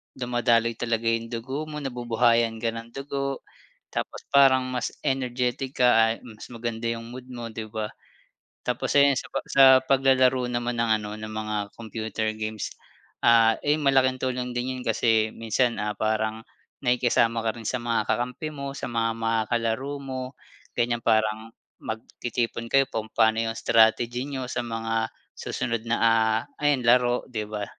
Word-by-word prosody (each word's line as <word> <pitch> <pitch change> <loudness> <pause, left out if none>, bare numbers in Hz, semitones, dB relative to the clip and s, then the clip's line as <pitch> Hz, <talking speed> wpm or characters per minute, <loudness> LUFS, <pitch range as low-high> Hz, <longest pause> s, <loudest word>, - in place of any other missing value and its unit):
dumadaloy 120 -2 +1
talaga 115 -1 -1
yung 115 0 -1
dugo 130 +6 -4
mo, 150 -1 -5
nabubuhayan 120 -3 +1
ka 115 - +1
ng 115 +1 -8
dugo. 140 0 -3 0.5
Tapos - - -4
parang 135 -2 +5
mas 125 -3 -2
energetic 130 0 -2
ka 125 - +7
a 115 -2 +6 0.2
mas 110 -3 -11
maganda 115 0 -4
yung 115 0 -8
mood 125 +1 -9
mo 120 -1 -6
'di 110 0 -6
ba? 110 -1 -3 0.7
Tapos 125 -1 -2
ayan 140 -1 +5
sa - - -3
pa 135 - 0
sa 135 - +6 0.2
paglalaro 130 -1 +3
naman 120 0 -2
ng 115 -1 +1
ano, 105 - -6
ng 110 0 -7
mga 110 0 -3 0.2
computer 110 -1 -3
games, 110 -1 -4 0.6
ah, 115 -1 +6
'yon, 150 +1 +2
malaking 130 -2 +3
tulong 125 -1 -2
din 125 +1 -2
'yon 125 - -6
kasi 110 -1 +2
minsan 115 0 0
ah, 105 -1 -3
parang 110 +1 -1 0.4
nakikisama 120 -2 +2
ka 110 +1 -2
rin 115 - -10
sa 125 +1 -1
mga 115 -2 0
kakampi 125 +7 -2
mo, 140 -1 -6
sa - - -4
mga 115 -1 +1
makakalaro 115 +3 -1
mo. 130 -1 -4 0.6
Ganyan 120 -1 +1
parang 110 0 +1 0.3
magtitipon 115 +1 -4
kayo 135 +2 +4
kung 110 -1 -3
paano 110 0 +3
yung 115 0 -3
strategy 120 +4 +3
niyo 130 -2 -4
sa 120 - -1
mga 115 -1 -2 0.2
susunod 115 -1 -3
na, 120 - +2
ah, 110 -1 +3 0.2
ayan 145 -4 +2
laro 125 0 +3
'di 110 -5 -4
ba? 105 -1 -3
120 Hz, 160 wpm, -25 LUFS, 115-130 Hz, 0.7 s, ka